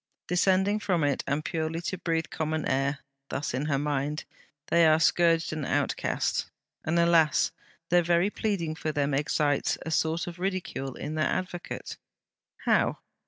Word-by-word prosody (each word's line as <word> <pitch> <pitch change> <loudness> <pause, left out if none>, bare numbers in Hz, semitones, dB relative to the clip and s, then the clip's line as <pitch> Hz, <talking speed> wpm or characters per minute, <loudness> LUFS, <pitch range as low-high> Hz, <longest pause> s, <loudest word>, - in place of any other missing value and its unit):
Descending 190 +3 +2
from 180 -6 0
it, 145 -2 +1
and 145 +3 -1
purely 160 0 -2
to 185 +2 -3
breathe 165 -2 0
common 155 0 -2
air 135 +2 0 0.3
(thus 140 - -3
in 130 +4 -1
her 140 -2 +1
mind), 145 +1 -1 0.5
they 170 -1 +6
are 155 0 +5
scourged 165 0 +3
and 155 -1 -3
outcast. - - 0 0.3
And 160 +2 0
alas! 170 -2 +4 0.4
the 175 0 +5
very 175 +4 +2
pleading 195 -9 -1
for 155 0 -3
them 145 -1 0
excites 145 0 +1
a 160 - -3
sort 160 +1 +1
of 175 0 -8
ridicule 180 -8 -3
in 150 - -5
their 155 0 +1
advocate. 180 -1 -4 0.7
How? - - +3
160 Hz, 155 wpm, -28 LUFS, 150-175 Hz, 0.7 s, they